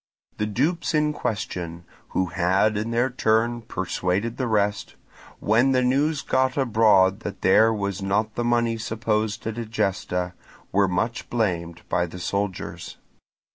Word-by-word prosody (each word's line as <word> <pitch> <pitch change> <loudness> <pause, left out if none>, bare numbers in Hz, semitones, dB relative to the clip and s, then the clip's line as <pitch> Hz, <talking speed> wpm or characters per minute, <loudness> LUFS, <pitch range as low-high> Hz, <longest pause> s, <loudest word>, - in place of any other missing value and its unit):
The 105 - -1
dupes 155 - 0
in 150 0 +2
question—who 90 - -4
had 95 +4 +1
in 105 +2 -2
their 120 +2 +1
turn 120 0 +1
persuaded 95 +2 -2
the 130 - -1
rest—when 110 +3 -1
the 130 0 +3
news 140 +4 +1
got 130 0 +1
abroad 105 -6 +4
that 105 -3 -7
there 110 +4 +5
was 100 -2 -2
not 105 +3 0
the 120 - -2
money 120 -1 +1
supposed 110 -1 -1
at 115 +1 -3
Egesta, 95 -5 -2 0.4
were 100 0 +3
much 100 +6 -2
blamed 90 -7 -2
by 90 0 0
the 90 - -9
soldiers. 95 +1 -4
110 Hz, 135 wpm, -24 LUFS, 95-120 Hz, 0.4 s, there